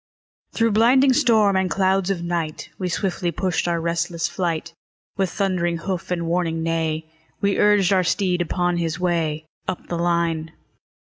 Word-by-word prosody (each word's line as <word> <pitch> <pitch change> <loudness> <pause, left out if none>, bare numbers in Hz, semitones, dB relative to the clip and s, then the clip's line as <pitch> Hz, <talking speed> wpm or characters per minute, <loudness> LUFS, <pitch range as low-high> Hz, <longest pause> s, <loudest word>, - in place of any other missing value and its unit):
Through 230 -1 +2
blinding 255 +5 +5
storm 225 -8 +4
and 190 -1 +1
clouds 190 0 +1
of 180 -3 -1
night, 170 -3 -3
We 185 -2 -2
swiftly 180 -1 -1
pushed 180 +1 -1
our 170 -1 0
restless 170 0 -1
flight; 170 -2 -3 0.4
With 195 -2 0
thundering 175 -3 0
hoof 180 +1 -4
and 175 -2 -1
warning 165 -1 -1
neigh, 160 -1 -1 0.3
We 200 0 +1
urged 205 -2 +4
our 185 -1 +3
steed 180 0 +1
upon 175 +1 0
his 165 0 -2
way 165 -3 -1 0.2
Up 180 - -4
the 170 - -2
line. 170 -2 0
175 Hz, 155 wpm, -22 LUFS, 170-195 Hz, 0.4 s, blinding